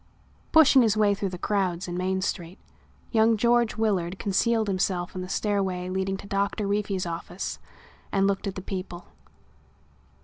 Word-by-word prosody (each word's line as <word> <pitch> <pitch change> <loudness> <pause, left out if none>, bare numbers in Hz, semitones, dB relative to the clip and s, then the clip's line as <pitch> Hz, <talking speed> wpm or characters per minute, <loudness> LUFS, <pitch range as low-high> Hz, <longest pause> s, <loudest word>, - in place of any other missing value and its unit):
Pushing 290 -4 +7
his 220 -3 +2
way 210 -1 +4
through 200 -1 -2
the 180 - -6
crowds 185 -2 -1
in 175 - -4
Main 185 +1 -1
Street, 175 -1 -4 0.5
young 225 -1 +4
George 235 +1 +2
Willard 195 -5 0
concealed 220 +4 +1
himself 185 -2 -1
in 185 - -5
the 185 - -6
stairway 190 -4 -1
leading 190 +1 -1
to - - -11
Doctor 200 +1 -1
Reefy's 200 -2 -1
office 170 +2 -5 0.5
and 195 0 +2
looked 200 +1 0
at 195 - -4
the 190 - -6
people. 185 -2 -6
195 Hz, 160 wpm, -26 LUFS, 185-210 Hz, 0.5 s, Pushing